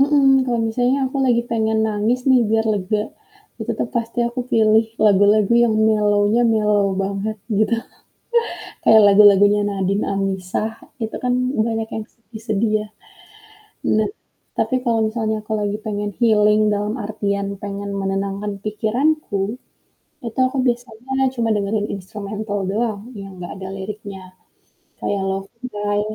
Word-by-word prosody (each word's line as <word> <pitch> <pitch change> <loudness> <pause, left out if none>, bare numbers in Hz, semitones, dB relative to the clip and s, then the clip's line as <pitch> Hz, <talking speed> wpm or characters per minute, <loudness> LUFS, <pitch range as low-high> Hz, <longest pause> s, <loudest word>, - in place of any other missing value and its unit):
Mhm, 285 0 +3 0.2
kalo 240 -2 0
misalnya 245 +4 +1
aku 270 - -6
lagi 235 -2 +3
pengen 220 -1 +1
nangis 215 +4 0
nih 260 -1 +6
biar 220 +1 +2
lega, 210 +1 -1 0.6
ya - - -5
tetep - - -2
pasti 230 0 -3
aku 240 +1 -4
pilih 220 -1 +4 0.2
lagu-lagu 205 +1 +4
yang 225 -2 +1
mellow-nya 210 +1 +3
mellow 210 -2 +2 0.2
banget 200 +2 -3 0.2
gitu. 230 +2 +2 1.1
Kayak 220 -1 +7
lagu-lagunya 205 0 +6
Nadin 195 0 -1
Amizah 195 +2 -2 0.3
itu 220 - -5
kan 250 - +2 0.3
banyak 225 -1 -2
yang 220 - -4
sedih-sedih 220 -1 -3
ya. - - -13 1.1
Nah 215 - +2 0.5
tapi - - +1
kalo 230 -1 +2
misalnya 220 -1 -1
aku 220 - -6
lagi 205 0 -1
pengen 205 -1 -2
healing 210 -2 +4
dalam 205 +1 -2
artian 200 -2 -2 0.2
pengen 200 0 -5
menenangkan 195 +1 -2
pikiranku, 215 -1 -1 0.7
itu 230 +2 -7
aku 260 - -4
biasanya 250 +2 -1
cuma 230 -1 0
dengerin 205 +1 -1
instrumental 205 +2 -5
doang 220 +2 -2
yang 195 -1 -9
gak 175 - -7
ada 190 - -6
liriknya, 195 -2 -8 0.6
kayak 200 -1 -1
Love 195 0 -3 0.2
Guy 205 0 -1
210 Hz, 135 wpm, -20 LUFS, 200-225 Hz, 1.1 s, Kayak